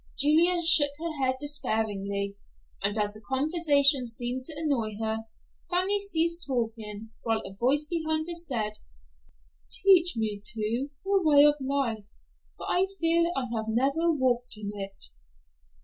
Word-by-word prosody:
Julia 335 +4 +4
shook 305 -3 +7
her 315 -4 -4
head 260 0 +1
despairingly, 200 -8 -2 0.5
and 200 +2 -1
as 205 -1 -1
the 215 - -13
conversation 280 +1 +4
seemed 245 +2 -4
to 315 - -2
annoy 245 -10 -1
her, 220 0 -3 0.4
Fanny 375 +3 +2
ceased 340 -3 +1
talking, 225 -4 -4
while 225 -1 -1
a 195 - -9
voice 265 +8 0
behind 315 -1 -2
her 345 - -2
said, 245 -11 -2 0.9
"Teach 355 -6 +3
me, 215 -2 -3
too, 230 +4 -2 0.2
the 395 0 +1
way 290 -2 +5
of 295 - +5
life, 260 -6 -2 0.5
for - - -9
I 370 +2 +2
fear 335 +1 +2
I 270 - -2
have 220 0 -4
never 275 +9 0
walked 250 -5 -1
in 205 -1 -6
it." 195 -1 -7
265 Hz, 145 wpm, -26 LUFS, 220-320 Hz, 0.9 s, shook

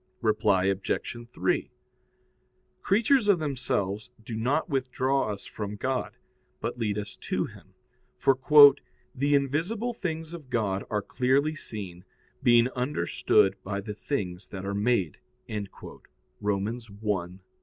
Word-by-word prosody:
Reply 105 -4 +3
Obj. 95 +4 -1 0.2
3: - - 0 1.1
Creatures 225 +4 +3
of 200 - +6
themselves 115 - -2 0.2
do 115 - -5
not 130 +8 0
withdraw 135 -3 0
us 100 -1 -6
from 105 -1 -5
God, 130 +4 -2 0.4
but - - -4
lead 105 -3 0
us 105 0 -5
to - - -1
Him; - - -14 0.4
for 135 - +3 0.8
"the 140 +2 +2
invisible 170 - 0
things 165 -6 -4
of 155 -6 -9
God 100 -5 0
are 105 -2 -1
clearly 135 +4 +1
seen, 100 - -7 0.4
being 120 -2 +5
understood 125 -6 +2
by 100 +1 -3
the 105 +1 -5
things 100 -6 -4
that 95 -1 -7
are 100 - -2
made" 100 -5 +1 0.3
(Rom. 105 -3 -7 0.4
1:20). 100 -3 -2
115 Hz, 125 wpm, -27 LUFS, 100-140 Hz, 1.1 s, of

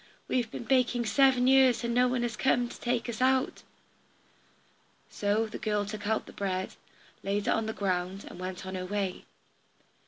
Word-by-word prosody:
We - - 0
have 240 -3 0
been - - -6
baking 245 -1 +2
seven 260 +1 +4
years, 260 -2 +5
and 235 0 -1
no 250 +1 +4
one 250 -1 0
has 235 -1 -2
come 245 -2 +2
to - - -11
take 240 -1 -1
us 235 0 -4
out." 260 0 +2 1.5
So 205 +2 +1
the 220 - -7
girl 210 -1 0
took 205 0 -6
out 220 0 0
the - - -12
bread, 190 -2 -2 0.5
laid 200 +1 -1
it - - 0
on 225 0 0
the - - -1
ground, 185 -1 -2
and - - -10
went 185 0 -5
on 190 - -6
her 185 -1 -4
way. 195 -2 -3
220 Hz, 190 wpm, -29 LUFS, 200-245 Hz, 1.5 s, years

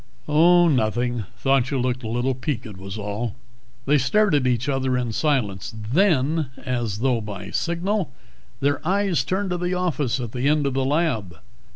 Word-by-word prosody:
"Oh, 175 +3 +5
nothing. 120 - 0
Thought 135 -1 +2
you 140 - -1
looked 125 0 -1
a 115 - -5
little 120 +4 0
peaked, 120 -5 -4
was 95 +2 -7
all." 105 +2 -3 0.5
They 145 +1 +4
stared 200 - +2
at 140 -3 +3
each 125 0 0
other 130 -2 0
in 120 -2 -1
silence. 110 -8 -1
Then, 150 - +2 0.2
as 120 -5 -2
though 125 -3 +2
by 100 -2 -7
signal, 180 +3 -1 0.5
their 145 +1 +1
eyes 190 -5 +1
turned 190 +7 -1
to 180 - -1
the 180 +1 -1
office 150 -8 0
at 120 -3 -4
the 125 +3 -1
end 150 -1 +2
of 140 - 0
the 135 0 0
lab. 130 - 0
130 Hz, 175 wpm, -23 LUFS, 120-160 Hz, 0.5 s, Oh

